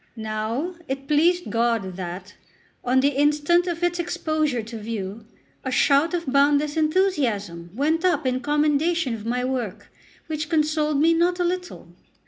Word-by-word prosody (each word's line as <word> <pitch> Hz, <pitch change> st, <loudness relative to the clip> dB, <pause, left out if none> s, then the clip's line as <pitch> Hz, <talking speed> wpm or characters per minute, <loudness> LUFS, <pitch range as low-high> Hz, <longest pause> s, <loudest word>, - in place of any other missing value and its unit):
Now 220 Hz, +9 st, -3 dB
it 270 Hz, +1 st, -4 dB
pleased 340 Hz, +4 st, +2 dB
God 230 Hz, -5 st, 0 dB
that, 185 Hz, +2 st, -7 dB, 0.5 s
on 255 Hz, +1 st, +3 dB
the 280 Hz, -, +4 dB
instant 295 Hz, +5 st, +2 dB
of 345 Hz, 0 st, -3 dB
its 350 Hz, 0 st, +1 dB
exposure 310 Hz, -7 st, -1 dB
to 225 Hz, +1 st, -8 dB
view, 215 Hz, 0 st, -6 dB, 0.4 s
a 260 Hz, -, -3 dB
shout 285 Hz, +6 st, +3 dB
of 340 Hz, -1 st, -3 dB
boundless 285 Hz, +2 st, +2 dB
enthusiasm 275 Hz, -, 0 dB
went 315 Hz, +6 st, +1 dB
up 320 Hz, -6 st, +2 dB
in 255 Hz, 0 st, +1 dB
commendation 295 Hz, 0 st, +1 dB
of 225 Hz, -1 st, -6 dB
my 250 Hz, +1 st, -1 dB
work, 250 Hz, -7 st, -4 dB, 0.3 s
which 310 Hz, -2 st, -4 dB
consoled 305 Hz, -2 st, +1 dB
me 325 Hz, +3 st, +4 dB
not 350 Hz, +2 st, +1 dB
a -, -, +2 dB
little. 360 Hz, +1 st, -4 dB
290 Hz, 150 wpm, -23 LUFS, 230-325 Hz, 0.5 s, the